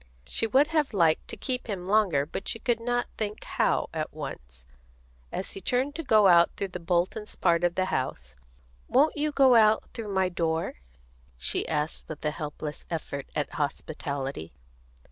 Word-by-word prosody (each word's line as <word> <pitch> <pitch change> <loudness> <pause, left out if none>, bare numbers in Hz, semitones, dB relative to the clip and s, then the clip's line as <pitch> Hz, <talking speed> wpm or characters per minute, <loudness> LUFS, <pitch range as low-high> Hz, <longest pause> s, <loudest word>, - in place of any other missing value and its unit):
She 225 - 0
would 265 +6 +5
have 305 -8 0
liked 165 -4 +3
to - - -7
keep 250 -2 -2
him 190 -5 -4
longer, 190 -8 +3
but 165 - -6
she - - 0
could 235 0 0
not 245 +1 0
think 210 -1 -3
how, - - +1
at - - -3
once. 65 0 -8 0.7
As 190 - -4
he 195 - -8
turned 255 +8 0
to 330 - -4
go 215 -7 +5
out 170 -2 +7
through 200 - -2
the 180 - -6
Boltons' 175 +5 -1
part 170 0 +2
of 175 0 +2
the 185 - +1
house, 65 - -3 0.5
"Won't 290 +5 +4
you 300 0 0
go 270 -3 +5
out 220 -2 +4
through 220 -3 -5
my 190 -1 +2
door?" 165 - -2 0.6
she - - -1
asked, 150 0 -2
with 155 -1 -7
a 150 - +2
helpless 150 -1 -6
effort 140 -4 -4
at 150 - -1
hospitality. 140 - -3
185 Hz, 175 wpm, -27 LUFS, 150-225 Hz, 0.7 s, out